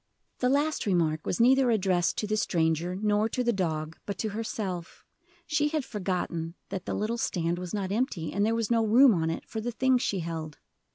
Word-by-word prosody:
The 250 - +2
last 290 -1 +1
remark 160 -5 +1
was 175 - -1
neither 260 +2 +5
addressed 190 -5 +1
to - - -1
the 215 +1 0
stranger 170 -2 0
nor 210 +2 +1
to 250 +2 -1
the 240 -1 +2
dog 160 -4 -2
but 200 -3 -3
to 220 - -2
herself 200 -5 -5 0.4
She 295 -1 +1
had 300 -3 -1
forgotten 180 -6 -3
that 190 -2 -5
the - - -1
little 225 +3 -1
stand 170 -3 -1
was 180 -1 -6
not 195 -2 -2
empty, 205 - -1
and 200 - +1
there 225 +2 +2
was 230 -1 -1
no 230 -1 +3
room 235 +3 +6
on 165 -3 0
it 165 - -4
for 220 - -4
the 240 +2 -2
things 255 +1 +2
she 195 -7 -1
held. 160 -2 -5
205 Hz, 210 wpm, -28 LUFS, 170-235 Hz, 0.4 s, room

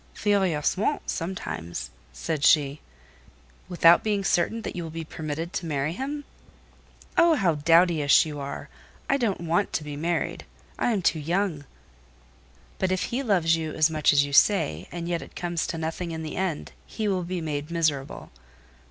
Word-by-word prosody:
"Furieusement 195 - +1
sometimes," 165 - -4 0.2
said 155 -3 -3
she. 145 -1 +4 0.9
"Without 170 -1 +5
being 205 -2 0
certain 220 +5 +1
that - - -5
you 175 - -3
will 165 - -5
be 165 +1 -5
permitted 160 +2 -5
to 170 - -3
marry 145 0 -1
him?" 285 +7 -4 0.9
"Oh, 335 -1 +6
how 185 - +2
dowdyish 165 -1 +4
you 150 -2 -6
are! 140 0 -6 0.4
I 275 - +2
don't 220 -9 -1
want 175 +4 0
to 155 - -1
be 150 -1 -6
married. 165 +3 -2 0.4
I - - +2
am 200 -5 -1
too 165 - +2
young." 165 -1 -1 1.1
"But 190 -1 0
if 185 - 0
he 255 - 0
loves 180 -9 +3
you 160 -2 -4
as 155 +1 +3
much 155 -2 +3
as 145 -1 +4
you 140 - -7
say, 90 - +3
and 170 -1 -5
yet 170 -1 -1
it - - -12
comes 175 -2 -2
to 165 - -4
nothing 165 +2 -3
in 160 -1 -5
the 155 - -5
end, 185 -5 -2 0.2
he 215 -2 -3
will 190 -2 +1
be 180 +1 -3
made 150 -2 -4
miserable." 155 -5 -2
165 Hz, 170 wpm, -26 LUFS, 155-185 Hz, 1.1 s, Oh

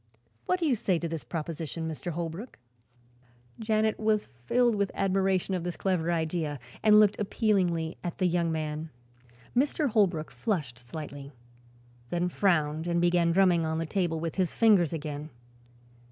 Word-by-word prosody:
What 365 - +2
do 340 - 0
you 275 -5 +3
say 190 -4 0
to 170 - -3
this 165 -4 -5
proposition, 160 +3 -4
Mr. 160 +2 -5
Holbrook?" 170 +8 -5 1.0
Janet 220 -1 +1
was 215 -1 +1 0.2
filled 245 -1 +3
with 200 -2 0
admiration 190 -1 +1
of 180 -2 -1
this 175 0 -4
clever 175 -3 0
idea 160 -3 -1 0.2
and 210 -1 +7
looked 210 -1 +4
appealingly 185 -6 0
at 175 -2 -4
the 185 - +1
young 170 -1 +1
man. 155 0 -3 0.7
Mr. 285 +3 +2
Holbrook 190 -8 +1
flushed 150 - -2
slightly, 140 +2 -8 0.8
then 175 +1 0
frowned 160 -4 +1
and 170 0 +1
began 175 -1 +3
drumming 180 -2 +4
on 160 0 -1
the 165 - -1
table 170 -2 -1
with 165 +2 -4
his 185 -3 +1
fingers 205 -8 +4
again. 150 -1 -5
175 Hz, 155 wpm, -28 LUFS, 160-200 Hz, 1.0 s, and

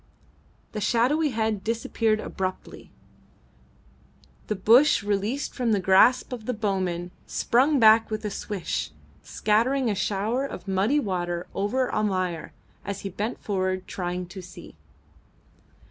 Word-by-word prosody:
The 210 - -4
shadowy 275 +9 +2
head 220 -4 -1
disappeared 225 -1 0
abruptly. 185 -3 -5 1.6
The 215 - -1
bush, 230 +6 +5
released 205 +7 -1
from 240 -4 0
the 205 - +2
grasp 195 +8 +4
of 225 -3 -7
the 250 - -1
bowman, 185 -4 -2 0.2
sprung 275 +5 +2
back 220 0 +6
with 215 0 -4
a 210 - -2
swish, 175 - -3 0.3
scattering 235 +4 +1
a - - +1
shower 210 +6 -1
of 200 -9 -7
muddy 195 +10 +2
water 175 -6 -2
over 245 +6 -1
Almayer, 185 -5 -1 0.3
as 200 -1 -5
he 195 - -4
bent 210 +5 -4
forward, 185 -2 -1
trying 180 0 -4
to 190 +1 -8
see. 180 - -12
210 Hz, 130 wpm, -25 LUFS, 185-230 Hz, 1.6 s, back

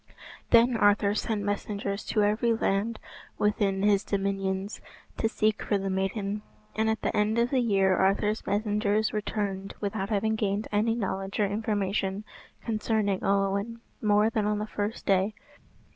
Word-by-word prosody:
Then 235 +1 +5
Arthur 205 -1 +4
sent 215 -1 -1
messengers 200 0 -3
to 215 - +1
every 220 +3 +2
land 220 +1 0 0.4
within 200 -2 +1
his 205 -1 +3
dominions 195 0 -2 0.4
to 225 - +1
seek 215 -1 0
for 205 - 0
the 195 0 -2
maiden; 195 +2 -2 0.3
and 220 0 +1
at 220 - -1
the - - 0
end 210 +2 +2
of 235 +1 +2
the 265 - +3
year 195 -5 +3
Arthur's 205 +3 +1
messengers 210 0 +1
returned 205 -2 -3
without 200 -1 -3
having 220 +1 +1
gained 210 -1 -1
any 220 +2 +2
knowledge 195 -3 -3
or 210 - +4
information 205 -1 -1 0.4
concerning 215 -3 0
Olwen 200 +3 0 0.2
more 210 +1 +3
than 215 -2 0
on 210 0 +1
the 210 - -2
first 210 +1 -4
day. 195 +2 +2
205 Hz, 150 wpm, -28 LUFS, 195-220 Hz, 0.4 s, Then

